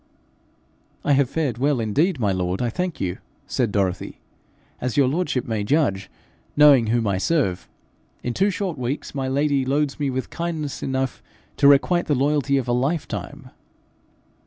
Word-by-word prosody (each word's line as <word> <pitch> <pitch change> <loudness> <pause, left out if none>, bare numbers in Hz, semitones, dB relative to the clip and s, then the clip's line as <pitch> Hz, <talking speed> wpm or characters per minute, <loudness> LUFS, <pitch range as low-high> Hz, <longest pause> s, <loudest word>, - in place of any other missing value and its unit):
'I 145 - +4
have 135 -2 +3
fared 140 -8 -2
well 140 -1 +2
indeed, 145 - +1
my 105 -4 +1
lord, 90 0 -1
I 120 -2 -1
thank 180 +4 -3
you,' 90 -2 -3 0.3
said 120 -5 -1
Dorothy, 95 -3 -2 0.6
'as 125 -2 -3
your 140 -2 +5
lordship 145 -3 -1
may 110 -3 -2
judge, 100 -7 +1 0.5
knowing 140 -6 +7
whom 115 +1 +1
I 100 -2 0
serve. 110 - 0 0.5
In 120 - -2
two 195 +8 +2
short 185 -7 -3
weeks 130 +4 -3
my 135 -2 -2
lady 140 0 +1
loads 140 +2 0
me 145 -2 0
with 130 0 -4
kindness 160 -4 -4
enough 130 -1 -2 0.4
to 140 - +5
requite 145 +5 +4
the 150 - +2
loyalty 140 +1 +1
of 130 -2 -2
a 120 - +1
life.' 140 +6 0
135 Hz, 160 wpm, -23 LUFS, 120-150 Hz, 0.6 s, knowing